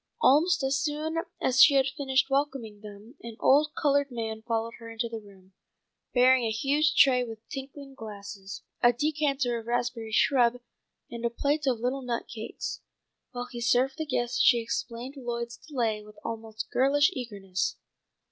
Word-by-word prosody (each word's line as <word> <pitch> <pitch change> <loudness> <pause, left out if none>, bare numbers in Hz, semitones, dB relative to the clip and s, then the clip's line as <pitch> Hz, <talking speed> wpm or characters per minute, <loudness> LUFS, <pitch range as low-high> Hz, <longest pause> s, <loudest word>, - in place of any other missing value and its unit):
Almost 330 - +4
as 270 0 +1
soon 305 +3 -2 0.2
as 260 0 +3
she 285 - +8
had 270 -1 +4
finished 265 -1 0
welcoming 270 -7 -2
them 210 +2 -12
an 230 -1 -9
old 300 +3 +4
coloured 285 -1 +2
man 225 -3 -4
followed 230 0 -2
her 230 -1 -9
into 230 +1 -3
the 230 -1 -6
room, 195 -2 -18 0.6
bearing 255 0 +5
a 225 - 0
huge 285 +7 +1
tray 255 -2 +5
with 225 -2 -9
tinkling 275 0 -8
glasses, 200 -4 -9 0.2
a 240 0 +6
decanter 275 -3 0
of 225 - -12
raspberry 240 -2 -2
shrub, 245 +1 +3 0.5
and 235 0 -7
a 235 - +2
plate 285 +5 -1
of 245 -4 +1
little 255 +3 -1
nut 240 -2 -3
cakes. 225 -2 -6 0.5
While 245 0 -5
he 240 -2 -6
served 255 +5 +2
the 315 - -3
guests 240 -3 -1
she 240 - +6
explained 235 +3 -5
Lloyd's 235 -2 -4
delay 235 -8 -2
with 210 0 -15
almost 220 -1 -6
girlish 290 +5 +3
eagerness. 200 - -3
245 Hz, 165 wpm, -28 LUFS, 225-275 Hz, 0.6 s, she